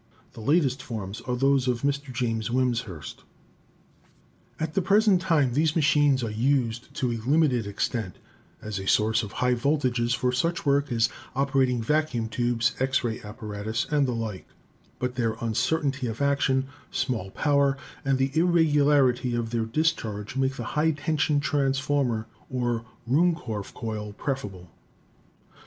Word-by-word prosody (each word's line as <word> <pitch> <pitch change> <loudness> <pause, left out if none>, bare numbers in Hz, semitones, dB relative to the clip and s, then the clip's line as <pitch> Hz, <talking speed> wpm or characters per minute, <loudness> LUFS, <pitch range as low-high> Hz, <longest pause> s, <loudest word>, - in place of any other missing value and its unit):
The 115 - -10
latest 140 0 +2
forms 105 -5 -6
are 125 - 0
those 135 0 +2
of 125 0 0
Mr. 140 -1 -1
James 115 -2 -1
Wimshurst." 120 - -2 1.4
At 155 0 -2
the 195 - +2
present 200 0 +4
time 150 -9 +2
these 150 +3 +2
machines 145 -4 +3
are 110 - -2
used 120 0 0
to 125 -2 0
a 115 - -2
limited 140 -8 +3
extent 100 -1 -2 0.5
as 105 -2 -4
a 95 - -6
source 110 +3 +3
of 105 -3 -7
high 125 0 +1
voltages 125 -2 +1
for 125 +1 0
such 165 +7 -1
work 140 0 +2
as 115 0 +2 0.3
oper 135 0 +2
ating 125 -3 +1
vacuum 130 -4 0
tubes, 120 -1 +1
X 130 +1 +1
ray 115 -2 -2
apparatus, 105 0 -4
and 145 -2 +3
the 125 - -1
like; 110 -4 -5 0.5
but 125 0 -2
their 115 -3 0
uncertainty 135 +4 0
of 110 0 -5
action, 140 -2 +2 0.2
small 115 -7 -2
power 140 +3 +2 0.3
and 135 -2 +2
the 135 +1 +1
irregular 150 -5 +4
ity 125 0 -1
of 115 -1 -2
their 115 -2 0
discharge 110 -6 -1
make 135 0 0
the - - -5
high 155 +2 +3
tensicn 150 0 +1
transformer 135 -5 0 0.2
or 120 -3 -1 0.2
Ruhmkorf 130 - 0
coil 105 -3 -5
preferable. 100 - -5
130 Hz, 150 wpm, -26 LUFS, 115-145 Hz, 1.4 s, present